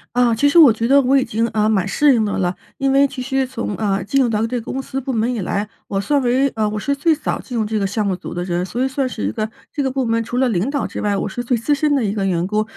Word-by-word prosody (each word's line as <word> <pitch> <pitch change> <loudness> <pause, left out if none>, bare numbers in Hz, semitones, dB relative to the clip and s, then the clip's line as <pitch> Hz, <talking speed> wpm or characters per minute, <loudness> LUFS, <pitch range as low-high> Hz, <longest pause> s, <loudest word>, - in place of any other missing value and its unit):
啊， 245 -2 +3
其 285 +6 +3
实 310 +4 +5
我 285 -7 +9
觉 230 +2 -1
得 280 +1 +5
我 270 +1 +3
已 265 - +2
经， 225 +2 -1
呃， 215 0 +2
蛮 200 -3 +1
适 290 +7 +4
应 225 -3 +2
的 205 - -2
了， 180 -1 0 0.2
因 270 0 +1
为 275 +1 +4
其 270 -1 -9
实 265 +1 -1
从， 230 -5 -4
呃， 200 -3 0
进 275 +7 +1
入 245 - +2
到 220 0 0
这 240 0 -3
个 - - -7
公 265 - -3
司 270 0 -4
部 265 +1 -3
门 235 +1 0
以 230 - -3
来， 200 +3 -2 0.2
我 195 - -2
算 285 +7 +1
为 255 +3 +2
呃， 215 -3 -1
我 215 - -4
是 280 +6 -1
最 315 +3 +2
早 300 - -3
进 245 - -6
入 220 - +1
这 215 0 -1
个 195 - 0
项 210 +1 -1
目 190 -2 0
组 180 - -9
的 175 0 -3
人， 175 -1 -1
所 235 +8 -2
以 - - +1
算 265 -1 -1
是 105 - -6
一 - - -1
个 215 - -3 0.2
这 290 - -2
个 265 - 0
部 260 -1 -1
门 230 0 0
除 240 +2 -4
了 260 - +3
领 205 +4 0
导 285 -1 -1
之 - - -5
外， 205 -1 0
我 - - -2
是 245 +5 -5
最 245 0 0
资 230 +6 0
深 295 -1 +1
的 245 -5 +1
一 200 - -1
个 195 -2 -1
员 175 -1 0
工。 210 +2 0
230 Hz, 350 characters per minute, -19 LUFS, 210-270 Hz, 0.2 s, 我